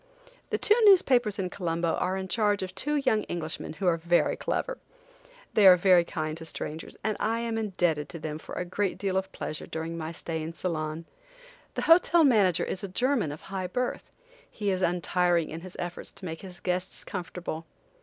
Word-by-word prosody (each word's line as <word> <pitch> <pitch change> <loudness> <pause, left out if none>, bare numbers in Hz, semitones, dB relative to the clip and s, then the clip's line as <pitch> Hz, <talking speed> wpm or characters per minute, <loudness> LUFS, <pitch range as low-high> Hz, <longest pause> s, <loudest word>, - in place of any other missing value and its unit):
The - - 0
two 420 - +4
newspapers 250 - +5
in 185 -2 -2
Colombo 170 -2 -1
are 185 +1 0
in 190 0 -4
charge 205 +2 +1
of 185 0 -6
two 295 +10 -1
young 255 -7 +2
Englishmen 155 -2 -3
who 165 +5 -5
are 175 -2 +3
very 175 +1 +2
clever. - - -2 0.7
They 205 -3 +6
are 180 -1 +9
very 180 -1 +5
kind 155 -2 -3
to 165 - -8
strangers, 160 0 -6
and 215 -1 0
I 225 +2 0
am 230 -1 -2
indebted 175 -8 0
to - - -6
them 155 -1 -5
for - - -9
a 180 - -2
great 190 +2 -1
deal 195 -2 -1
of 190 0 -1
pleasure 155 - -5
during 160 +1 -4
my 160 0 -4
stay 165 -1 -4
in 160 +2 -5
Ceylon. 160 -2 -3 0.7
The - - -1
hotel 335 0 +6
manager 205 - +4
is 190 - -3
a - - -2
German 235 - +1
of 150 - -8
high 190 -1 -4
birth. 250 +7 -3 0.4
He 205 -2 -2
is 185 0 -1
untiring 175 -1 +1
in 165 +2 -6
his 185 0 -10
efforts 175 0 -5
to 190 - -10
make 165 -2 -5
his 180 -2 -10
guests 180 +1 -2
comfortable. 170 -3 -5
180 Hz, 195 wpm, -28 LUFS, 165-205 Hz, 0.7 s, are